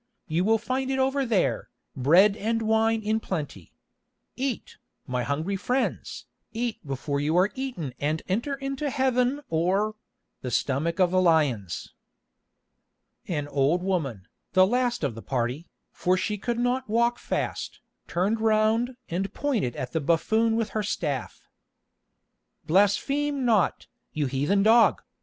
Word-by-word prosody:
You 165 +3 0
will 225 +3 +3
find 260 +4 -2
it 265 - 0
over 265 0 +1
there, 215 -6 0 0.3
bread 175 +10 +5
and 225 +1 -1
wine 220 0 +2
in 215 +1 +1
plenty. 170 -9 -5 0.6
Eat, 260 -2 -4 0.3
my 125 -4 -2
hungry 155 +10 -2
friends, 250 +7 -2 0.3
eat 235 0 -3
before 140 +1 -3
you 155 +4 +1
are 185 +3 +3
eaten 245 - -4
and 155 +2 -1
enter 235 +9 -1
into 275 +1 -3
Heaven 260 0 +1
or—the 190 - -2
stomach 145 - 0
of 180 -2 +4
the 185 0 +3
lions." 145 - +1 1.3
An 150 -5 -2
old 145 +5 +1
woman, 140 - -2 0.3
the 185 0 +6
last 245 -1 0
of 140 -5 0
the 115 - -9
party, 125 +6 -2 0.2
for 185 +1 +1
she 210 +3 -1
could 230 +3 -3
not 245 +1 0
walk 235 +2 +2
fast, - - -3 0.3
turned 200 +6 0
round 225 +3 +2
and 190 +3 -2
pointed 230 - -1
at 125 -1 -5
the 160 - -1
buffoon 220 +9 +2
with 225 -1 0
her 215 - -2
staff. 150 - -3 1.2
"Blaspheme 270 - +2
not, 215 -7 +2 0.3
you 150 -1 0
heathen 145 +10 +1
dog!" 225 +2 +5
200 Hz, 140 wpm, -26 LUFS, 155-235 Hz, 1.3 s, the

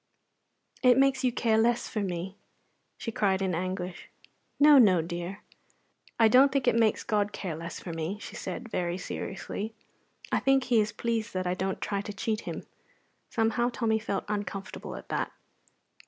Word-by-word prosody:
"It 250 -1 +6
makes 270 0 +3
you 250 - +3
care 225 -2 +2
less 235 +1 +2
for 215 - -3
me!" 185 -1 -3 0.6
she 230 - -4
cried 195 -3 +1
in 190 -2 0
anguish. 180 +1 -4 0.5
"No, 290 -1 +8
no, 195 -7 +6
dear." 175 +4 -5 0.8
"I 225 - +7
don't 260 +5 +6
think 270 -2 0
it - - +5
makes 225 -2 +2
God 205 -1 +1
care 180 -6 -4
less 165 +2 -6
for 170 - -6
me," 165 +5 -3
she - - -9
said, 190 +5 -5
very 175 -5 -2
seriously. 205 +3 -5 0.6
"I - - +3
think 270 -1 +3
He 235 -3 +3
is 210 0 -1
pleased 230 0 -2
that 185 0 -1
I 180 - +1
don't 190 0 -2
try 200 -1 -1
to 205 0 -6
cheat 215 +1 -2
Him." - - -5 0.7
Somehow 230 +1 +1
Tommy 225 -3 0
felt 200 -3 -3
uncomfortable 205 -1 -4
at - - -10
that. - - -1
210 Hz, 170 wpm, -29 LUFS, 185-235 Hz, 0.8 s, No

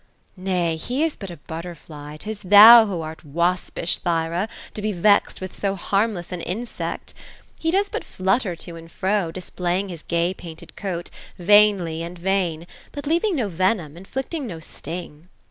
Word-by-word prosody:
" - - -40
Nay, 180 -3 0
he 250 - -1
is 325 -2 0
but 195 - -8
a 170 - -8
butterfly. 155 -2 -8
'Tis 215 +5 -6
thou 215 +4 +10
who 180 -5 -3
art 160 +1 -7
waspish, 170 +3 -1
Thyra, 170 +3 -1 0.2
to 210 - -5
be 215 +1 0
vexed 200 +2 +3
with 185 0 -6
so 195 -1 -1
harmless 195 -1 -1
an 180 -1 -4
insect. 225 +8 -4 0.5
He 325 - 0
does 395 +4 +2
but - - -4
flutter 190 0 0
to 170 0 -8
and 165 0 -12
fro, 190 -2 0
displaying 180 +2 -2
his 170 -3 -7
gay 170 +2 0
painted 165 -4 -11
coat, 180 -4 -4 0.3
vainly, 185 -4 +4
and 170 +2 -6
vain; 175 -3 0 0.3
but 285 0 -7
leaving 340 +6 +1
no 245 -8 0
Yenom, 185 -3 0
.inflicting 265 - -5
no 170 -6 -6
sting." 165 0 -8
185 Hz, 165 wpm, -23 LUFS, 170-210 Hz, 0.5 s, thou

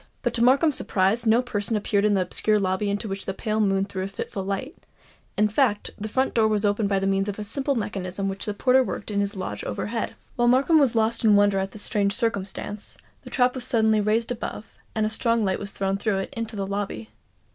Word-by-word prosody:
But - - 0
to 235 - +2
Markham's 275 +4 +4
surprise 205 +5 +1
no 230 +3 +4
person 220 -2 -1
appeared 205 0 +1
in 210 -1 +3
the 190 - +2
obscure 210 +4 +1
lobby 190 +1 0
into 205 +2 -2
which 195 -1 -5
the 190 - -2
pale 215 0 -2
moon 195 -1 +2
threw 190 -1 -5
a 190 - -2
fitful 195 0 -5
light; 200 - -4 0.6
in 210 +1 +4
fact, 215 -1 +1
the 215 +1 -6
front 260 +5 0
door 225 -2 +3
was 215 -1 +1
opened 205 0 +1
by 195 -1 +2
means 195 +1 +1
of 200 - -5
a 210 - -4
simple 270 +6 -1
mechanism 195 -3 -3
which 195 0 -4
the 210 - -3
porter 260 +3 +4
worked 230 - -5
in 200 - 0
his 200 +1 -1
lodge 105 - -5
overhead. 215 - -3 0.2
While 240 0 +3
Markham 275 +6 +5
was 270 -5 +3
lost 225 +1 +1
in 215 -2 +6
wonder 205 -1 +4
at 190 0 -2
this 205 +1 -6
strange 200 -1 +1
circumstance, 205 -1 -3 0.2
the - - -11
trap 250 -2 +2
was 260 - -4
suddenly 220 -3 +3
raised 220 +3 +1
above, 225 -2 -6 0.2
and 215 -1 +1
a - - +2
strong 230 0 +1
light 190 -1 0
was 200 -1 -4
thrown 195 0 -1
through 205 -1 0
it 195 - -4
into 230 -1 -4
the 195 -1 -2
lobby. 195 - -4
210 Hz, 235 wpm, -25 LUFS, 195-230 Hz, 0.6 s, in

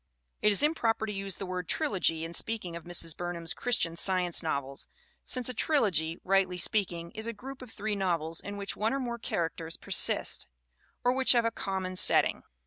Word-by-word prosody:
It 210 - +4
is 205 - +1
improper 235 -8 +1
to 210 - -4
use 195 -2 -3
the 195 - -6
word 180 -2 -5
trilogy 180 - +1
in 165 - -7
speaking 200 -4 -1
of 170 - -8
Mrs. 170 -2 +3
Burnham's 175 -2 -4
Christian 175 -9 0
Science 180 -1 +3
novels, 140 -4 -3 0.4
since 250 -2 0
a 255 - 0
trilogy, 195 - +1
rightly 190 -1 +2
speaking, 175 -3 0
is 220 +1 -5
a 230 - -3
group 260 +5 -9
of 250 - -9
three 215 -1 -3
novels 170 -4 -1
in 205 0 -7
which 200 -1 -4
one 220 +3 0
or - - -1
more 240 -2 -4
characters 165 -4 -3
persist, - - +1 0.6
or 245 +1 +3
which 265 0 +6
have 235 -2 +3
a 230 - +1
common 190 -3 -3
setting. - - +4
195 Hz, 190 wpm, -29 LUFS, 170-225 Hz, 0.6 s, which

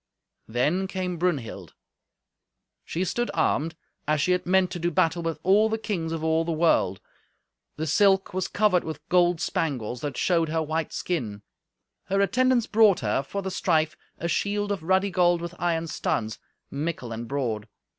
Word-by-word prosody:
Then 150 +12 0
came 185 -2 -3
Brunhild. 135 - -2 1.1
She 180 +3 -2
stood 240 +6 -1
armed, 160 0 +1 0.3
as 155 0 +2
she 180 - +2
had 180 -1 0
meant 185 0 +3
to 175 - -4
do 170 +1 0
battle 165 +1 +1
with 165 -1 -2
all 205 +4 +4
the 220 - 0
kings 180 -7 -3
of 165 -1 -3
all 160 0 +2
the 170 - -2
world. 155 - +2 0.8
The 155 - -3
silk 195 +5 +3
was 185 0 -1
covered 205 -4 +2
with 160 -2 -7
gold 175 -1 +3
spangles 125 -9 -2
that 145 -4 -4
showed 165 -3 +2
her 160 0 0
white 155 0 -2
skin. 110 - -3 0.6
Her 195 +1 0
attendants 250 +3 +3
brought 215 -3 +4
her, 110 +3 +1
for 200 +8 -5
the 190 - -3
strife, 160 -4 +1 0.2
a 170 - -3
shield 205 +3 0
of 200 -4 -2
ruddy 190 +4 +2
gold 175 -1 +3
with 170 0 -6
iron 165 -1 0
studs, 110 -8 -2 0.3
mickle 145 -4 -3
and 115 +1 -5
broad. 115 -6 -2
170 Hz, 170 wpm, -26 LUFS, 150-190 Hz, 1.1 s, all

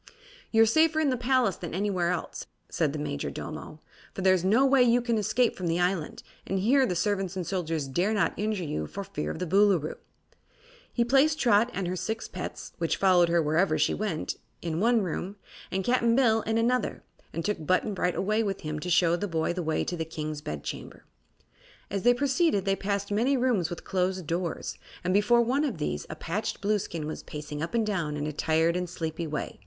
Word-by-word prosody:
"You're 225 0 +6
safer 315 +7 +3
in 300 -3 +2
the - - +1
palace 250 -4 +1
than 170 -2 -6
anywhere 185 -3 0
else," 180 -2 -4 0.2
said 155 -4 0
the 155 - -4
Majordomo, 150 - -5 0.3
"for 190 - -4
there 190 0 +6
is 180 -2 +1
no 220 +8 +4
way 270 -1 +5
you 245 0 +5
can 235 -2 0
escape 235 +3 +1
from 180 - -4
the 165 +1 +1
island, 180 -3 -1 0.2
and 195 - -1
here 255 +8 +3
the 180 - -1
servants 195 0 -1
and 185 -2 -3
soldiers 165 -5 -2
dare 175 +10 0
not 210 -2 +1
injure 210 -3 -1
you 75 - -3
for - - -6
fear 75 - -4
of - - -4
the 180 - -2
Boolooroo." 190 -3 +3 0.9
He 235 - +1
placed 275 +5 +4
Trot 230 -1 +4
and 195 -6 -3
her 180 - -2
six 220 +4 -3
pets 180 - -7
which 165 -1 0
followed 180 -3 +4
her 170 -1 +3
wherever 160 +6 +2
she - - +2
went 205 -7 -3 0.2
in 165 -1 -3
one 230 +1 +3
room, 185 +2 -4 0.3
and 190 0 -1
Cap'n 235 +1 +2
Bill 225 -4 +4
in 220 +1 -1
another, 245 +2 0 0.3
and 165 - -4
took 205 -6 -1
Button 185 +6 +1
Bright 180 -2 0
away 215 +3 +1
with 200 -3 -2
him 155 0 -4
to 180 - -5
show 170 0 +4
the 205 +4 -3
boy 165 -1 0
the 180 - -3
way 160 -1 0
to 180 - -3
the 165 - -2
King's 155 -2 -5
bedchamber. 75 - -6 0.9
As 200 0 -1
they 245 +3 +5
proceeded 270 - +1
they 195 0 +2
passed 200 +1 -2
many 245 +7 +2
rooms 240 -9 +1
with 175 - -7
closed 185 -1 -1
doors, 170 +2 -3 0.2
and 180 +1 0
before 210 +4 +4
one 260 +5 +1
of 260 - -2
these 75 - -3
a - - -5
patched - - -3
Blueskin 200 -6 -1
was 155 - -5
pacing 150 0 -7
up 165 +8 -3
and 225 -2 +2
down 170 -8 -2
in 145 - -2
a 155 - -3
tired 160 +3 +2
and 180 -1 -2
sleepy 165 -1 -4
way. 150 -1 -4
190 Hz, 210 wpm, -28 LUFS, 165-225 Hz, 0.9 s, You're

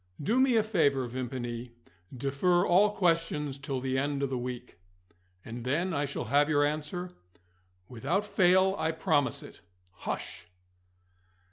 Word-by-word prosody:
"Do 225 - +1
me 260 -2 +4
a 220 - +4
favour, 145 - +2
Vimpany. 120 -1 -5 0.4
Defer 140 +8 +1
all 195 +4 +5
questions 165 -7 0
till 140 -1 -3
the 130 +1 -1
end 140 0 -1
of 135 - -1
the - - -1
week." 125 -5 -7 0.7
"And 115 +1 -7
then 165 +9 0
I 145 -1 0
shall 140 - -4
have 145 +5 +2
your 145 -1 +3
answer?" 155 +5 -3 0.8
"Without 145 - -1
fail, 190 -1 +3
I 160 - 0
promise 160 -3 0
it. - - -13 0.3
Hush!" 90 - -6
145 Hz, 140 wpm, -29 LUFS, 130-180 Hz, 0.8 s, all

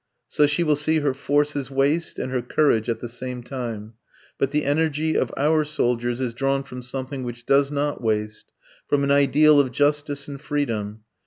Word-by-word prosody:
So 150 - +3
she 145 +4 0
will 155 -2 +3
see 155 +2 +1
her 145 -2 +1
forces 145 0 0
waste 140 +5 0
and 130 - -4
her 130 -1 0
courage 120 -3 +1
at 115 -1 -2
the 120 - -4
same 125 +1 -6
time. 115 -4 -6 0.5
But 135 - +1
the 150 +1 -1
energy 155 +1 +1
of - - +1
our 155 +2 +3
soldiers 120 -5 -1
is 125 -3 -2
drawn 135 +2 0
from 125 -2 -9
something 130 +2 -5
which 120 -1 -7
does 140 0 +3
not 145 -1 -2
waste, 105 -2 -2 0.4
from 145 -1 +1
an 140 - +1
ideal 145 +2 +5
of 135 -3 +2
justice 145 +1 0
and 140 -1 -8
freedom. 110 -8 -3
140 Hz, 185 wpm, -23 LUFS, 125-145 Hz, 0.5 s, ideal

